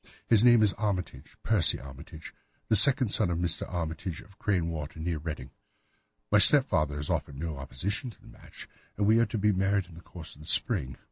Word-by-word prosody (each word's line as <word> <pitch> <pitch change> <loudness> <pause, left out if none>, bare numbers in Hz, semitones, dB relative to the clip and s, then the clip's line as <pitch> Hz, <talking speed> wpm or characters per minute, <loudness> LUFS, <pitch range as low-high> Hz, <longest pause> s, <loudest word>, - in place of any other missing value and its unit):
His 115 -2 +3
name 120 -2 +6
is 105 - +2
Armitage—Percy 95 - -1
Armitage—the 75 +9 -8
second 130 +1 +6
son 90 - +1
of 85 - -2
Mr. 85 0 -2
Armitage, 85 0 -5
of 100 +1 -20
Crane 90 -5 0
Water, 80 -1 -7
near 80 -1 -3
Reading. 80 0 -7 0.8
My 105 - +5
stepfather 95 - +3
has 75 0 -4
offered 70 - -3
no 80 0 -5
opposition 80 - -5
to 110 - -15
the - - -20
match, - - -13 0.3
and 105 - 0
we 110 +2 +4
are 115 - +2
to 110 - -4
be 105 +1 +2
married 95 0 0
in 85 - -17
the 85 - -13
course 85 -2 -11
of 75 - -16
the 75 - -12
spring. 80 - 0
90 Hz, 195 wpm, -28 LUFS, 80-105 Hz, 0.8 s, name